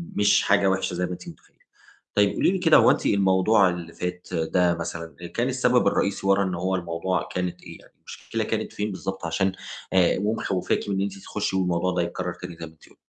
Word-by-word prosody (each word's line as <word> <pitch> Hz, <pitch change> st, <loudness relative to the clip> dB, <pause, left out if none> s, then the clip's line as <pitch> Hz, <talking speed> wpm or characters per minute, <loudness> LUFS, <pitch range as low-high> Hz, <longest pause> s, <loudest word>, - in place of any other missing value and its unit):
مش 105 Hz, 0 st, +4 dB
حاجة 100 Hz, 0 st, +3 dB
وِحشة 95 Hz, -1 st, -1 dB
زي 90 Hz, +1 st, -1 dB
ما -, -, -6 dB
أنتِ 90 Hz, -, -8 dB
مُتخيّلة. -, -, -17 dB, 0.6 s
طيب 100 Hz, -1 st, +3 dB
قولي -, -, +3 dB
لي 190 Hz, -, 0 dB
كده، 165 Hz, -3 st, +5 dB
هو -, -, +6 dB
أنتِ -, -, -1 dB
الموضوع 95 Hz, +1 st, +4 dB
اللي 85 Hz, -1 st, -6 dB
فات 90 Hz, 0 st, -5 dB
ده 85 Hz, +1 st, +2 dB
مثلًا 85 Hz, -1 st, -6 dB
آآ، 85 Hz, -, -6 dB
كان 115 Hz, +9 st, -1 dB
السَبب 125 Hz, -3 st, +2 dB
الرئيسي 100 Hz, 0 st, 0 dB
ورا 100 Hz, 0 st, +4 dB
إن 90 Hz, -2 st, -2 dB
هو 95 Hz, +2 st, -1 dB
الموضوع 85 Hz, +1 st, -2 dB
كانت 90 Hz, -1 st, -3 dB
إيه -, -, -11 dB
يعني، -, -, -21 dB
المشكلة -, -, -5 dB
كانت -, -, -3 dB
فين 105 Hz, 0 st, -3 dB
بالضبط، 95 Hz, -1 st, -5 dB
عشان 95 Hz, +4 st, 0 dB, 0.4 s
آآ، 90 Hz, -2 st, +4 dB
ومخوّفاكِ 100 Hz, -1 st, -1 dB
من 100 Hz, -, 0 dB
إن 95 Hz, -, 0 dB
أنتِ 100 Hz, 0 st, -3 dB
تخُشّي 100 Hz, 0 st, -3 dB
والموضوع 90 Hz, -1 st, +1 dB
ده -, -, +1 dB
يتكرر 90 Hz, +1 st, -3 dB
تاني 85 Hz, -, -9 dB
زي 85 Hz, -, -6 dB
ما 80 Hz, -, -12 dB
أنتِ 75 Hz, -, -21 dB
قل -, -, -22 dB
95 Hz, 220 wpm, -25 LUFS, 85-100 Hz, 0.6 s, هو